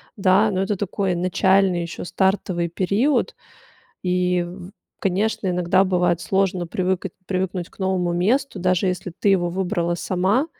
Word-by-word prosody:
Да, 195 +2 +3
но 190 -1 -1
это 195 0 -1
такой 195 -2 -1
начальный 185 0 +2
ещё 170 +1 -6
стартовый 185 -3 0
период. 200 - +1 0.7
И, 180 -1 +1
в 180 +2 -9 0.3
конечно, 205 +2 0
иногда 180 +1 +2
бывает 180 -2 +1
сложно 190 -2 0
привыка 185 0 -1 0.2
привыкнуть 185 -2 -2
к - - -25
новому 185 -2 0
месту, 210 +6 0
даже 185 +1 +1
если 180 0 -3
ты 205 - +2
его 175 -3 +2
выбрала 175 -2 -1
сама. 195 - +1
185 Hz, 140 wpm, -22 LUFS, 180-195 Hz, 0.7 s, Да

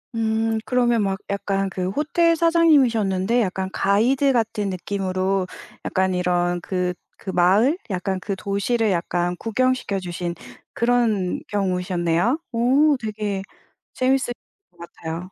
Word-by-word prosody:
음. 225 0 0
그러면 240 -2 +2
막 195 0 -1
약간 195 -1 -1
그 185 0 -3
호텔 330 - +2
사장님이셨는데 245 - +3
약간 190 -2 -2
가이드 255 +8 +2
같은 220 -4 0
느낌으로 190 0 -1 0.4
약간 190 0 +1
이런 175 -1 0
그 180 0 -1 0.3
그 190 - -5
마을? 200 - +3
약간 190 0 -2
그 195 +2 -3
도시를 200 +3 0
약간 175 0 -1
구경시켜 255 -3 0
주신 175 -1 -4 0.4
그런 230 -6 +1
경우셨네요. 180 - 0
어 270 +6 +4
되게 210 -3 -3 0.5
재미있을 255 -1 +1 0.4
것 175 - -31
같아요. 170 +1 -7
200 Hz, 265 characters per minute, -22 LUFS, 185-240 Hz, 0.5 s, 어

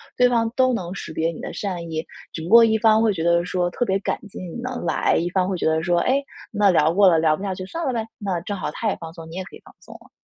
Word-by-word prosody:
对 250 0 +4
方 230 -2 +2
都 255 -1 +3
能 180 -6 -3
识 195 - -7
别 160 +1 -1
你 160 - -10
的 - - -6
善 185 -4 -4
意， 160 0 -3 0.3
只 160 - -6
不 165 - -6
过 235 +1 +8
一 220 -1 +3
方 220 0 +4
会 225 -2 +3
觉 165 -4 -3
得 170 0 +3
说 180 0 -1
“特 245 - -1
别 195 -4 +1
感 - - -2
激 205 - -10
你 180 -3 -7
能 250 -6 -5
来”， - - +1
一 175 +2 -1
方 185 0 +1
会 185 - -2
觉 - - -3
得 160 0 +2
说” 175 +1 +1
哎， 270 +2 +2 0.3
那 205 -1 +3
聊 160 -3 +3
过 200 +2 +5
了， 165 - +4
聊 160 -1 +3
不 - - -11
下 195 -2 -3
去 185 - -6
算 330 - -4
了 - - +1
呗“。 230 -3 -2 0.2
那 185 -3 -1
正 200 +3 -4
好 190 - -4
他 225 - -4
也 - - -1
放 165 -1 -8
松， 165 -2 -10
你 170 - -9
也 190 - -4
可 - - -13
以 - - -15
放 - - -16
松 - - -14
了。 - - -16
185 Hz, 340 characters per minute, -22 LUFS, 170-220 Hz, 0.3 s, 过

